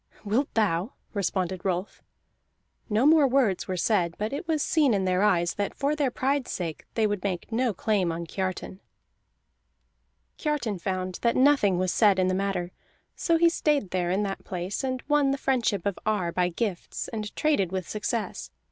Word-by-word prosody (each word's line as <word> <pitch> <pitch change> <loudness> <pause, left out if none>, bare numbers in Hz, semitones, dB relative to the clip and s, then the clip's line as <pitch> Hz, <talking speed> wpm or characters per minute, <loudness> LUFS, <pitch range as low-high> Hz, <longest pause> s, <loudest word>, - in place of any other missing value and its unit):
"Wilt 235 +8 0
thou?" 205 -1 +1 0.2
responded 185 -2 -1
Rolf. 185 +1 -2 0.9
No 220 +4 +2
more 305 -2 +6
words 250 -8 +1
were 185 - -2
said, 175 -4 +1
but 215 +4 -3
it 290 +4 -4
was 315 -3 +1
seen 290 -8 +3
in 190 -1 0
their 185 0 +2
eyes 175 -5 +2
that 205 -1 -3
for 285 +2 0
their 290 -3 +1
pride's 265 +1 -1
sake 165 -4 -4
they 225 - +2
would 205 -3 -1
make 190 -1 -3
no 240 +1 +1
claim 195 -3 0
on 170 +1 -4
Kiartan. 185 +1 -4 1.6
Kiartan 275 - -1
found 185 0 -3
that 235 - +2
nothing 255 -9 +4
was 185 0 0
said 205 -4 +4
in 185 0 +2
the - - +1
matter; 185 -2 -1 0.4
so 335 -1 +2
he 340 +1 +5
stayed 295 - +1
there 180 -1 0
in 190 +3 +1
the 195 -1 -2
place, 180 +6 -4
and 260 -1 -2
won 295 -2 +3
the 275 - 0
friendship 240 -9 0
of 200 -2 -1
Ar 205 -5 0
by 180 +1 +1
gifts, 185 0 -3
and 215 -2 -5
traded 285 - +1
with 185 -2 -3
success. 215 +1 -3
205 Hz, 180 wpm, -27 LUFS, 185-260 Hz, 1.6 s, more